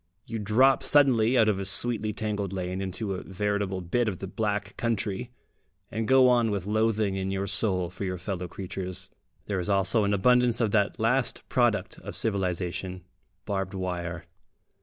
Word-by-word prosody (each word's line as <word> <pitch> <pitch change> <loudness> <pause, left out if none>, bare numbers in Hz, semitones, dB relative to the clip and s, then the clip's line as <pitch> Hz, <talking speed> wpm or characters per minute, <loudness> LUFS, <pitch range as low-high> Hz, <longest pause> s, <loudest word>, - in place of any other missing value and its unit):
You 115 -1 -4
drop 120 +6 +4
suddenly 130 -4 +4
out 110 - +5
of 105 -3 +1
a 95 - -3
sweetly 110 +2 0
tangled 105 -2 -3
lane 95 0 -3
into 95 +2 -3
a 90 - -4
veritable 100 -1 -2
bit 115 +7 0
of 100 -4 -2
the 95 - -6
Black 105 0 -2
Country, 115 0 -2 0.6
and 110 0 -2
go 130 -1 +6
on 120 -2 +4
with 100 -3 -2
loathing 110 -1 +1
in 95 0 -2
your 95 0 -1
soul 95 -3 0
for 90 +2 -7
your 95 -1 -2
fellow 90 -1 -4
creatures. 95 0 -6 0.3
There 100 -2 -2
is 90 - -3
also 100 +2 +3
an 100 0 +2
abundance 125 +3 +3
of 110 -4 +1
that 100 +1 +1
last 125 +3 0
product 120 -4 +1
of - - -8
civilisation, 90 -3 -2 0.4
barbed 95 -2 -2
wire. 85 -2 -4
100 Hz, 170 wpm, -27 LUFS, 95-115 Hz, 0.6 s, go